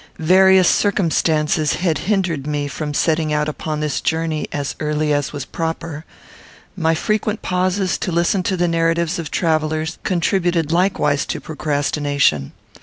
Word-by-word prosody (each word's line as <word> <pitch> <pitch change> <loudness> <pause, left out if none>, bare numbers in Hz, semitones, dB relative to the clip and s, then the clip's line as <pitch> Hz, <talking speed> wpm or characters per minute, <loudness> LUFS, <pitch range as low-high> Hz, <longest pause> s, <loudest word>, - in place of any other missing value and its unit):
Various 185 +2 +5
circumstances 160 -6 +1
had 165 -5 0
hindered 175 -9 0
me 145 -1 -1
from 150 +1 -4
setting 155 +1 +1
out 150 0 +1
upon 155 0 -4
this 150 -3 -1
journey 160 -1 -1
as 145 -1 -3
early 150 0 0
as 145 -1 -1
was 140 -2 -5
proper. 165 -1 -4 0.7
My 165 -3 +1
frequent 215 +4 -1
pauses 185 +1 0
to 185 - -2
listen 170 +3 +1
to 190 - -1
the 175 0 +1
narratives 165 +1 0
of 160 -3 -5
travellers 155 -1 -1
contributed 175 -3 0
likewise 175 -5 +1
to - - -3
procrastination. 145 - 0
160 Hz, 140 wpm, -19 LUFS, 150-180 Hz, 0.7 s, Various